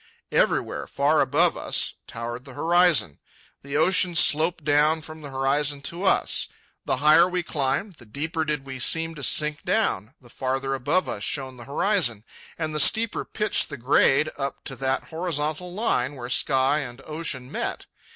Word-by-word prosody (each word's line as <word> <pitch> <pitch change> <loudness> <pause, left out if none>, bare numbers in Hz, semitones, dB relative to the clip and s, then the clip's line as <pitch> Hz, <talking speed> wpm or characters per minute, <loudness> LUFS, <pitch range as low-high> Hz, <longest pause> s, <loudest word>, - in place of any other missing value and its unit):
Everywhere, - - 0
far 145 +2 +2
above 165 +5 +2
us, - - -1
towered 120 +1 -6
the 135 -2 -12
horizon. 165 - +3 0.4
The 140 +1 -4
ocean 180 +1 +3
sloped 160 +2 +3
down 150 +2 +2
from 155 0 -10
the 145 - -8
horizon 140 +2 0
to 175 +6 -4
us. 190 - +2 0.4
The - - 0
higher 155 +5 +5
we 180 -1 -2
climbed, 155 +5 -2
the 120 - -15
deeper 160 - -3
did 150 -3 -3
we 130 -1 -7
seem 165 +5 +1
to 150 - -10
sink 150 +2 +1
down, 105 +9 -1
the 125 - -19
farther 135 +1 -2
above 145 +8 0
us 100 - -4
shone 130 -3 -3
the 120 - -10
horizon, 140 - +1 0.3
and 155 -2 -3
the 150 - -1
steeper 225 +6 +3
pitched 210 0 -1
the - - -6
grade 135 +4 +3
up 140 -1 -4
to 135 - -4
that 135 0 -1
horizontal 160 0 -3
line 145 - -1
where 120 -2 -7
sky 135 +3 +2
and 135 -2 -7
ocean 150 -5 -4
met. - - -3
150 Hz, 170 wpm, -24 LUFS, 135-165 Hz, 0.4 s, higher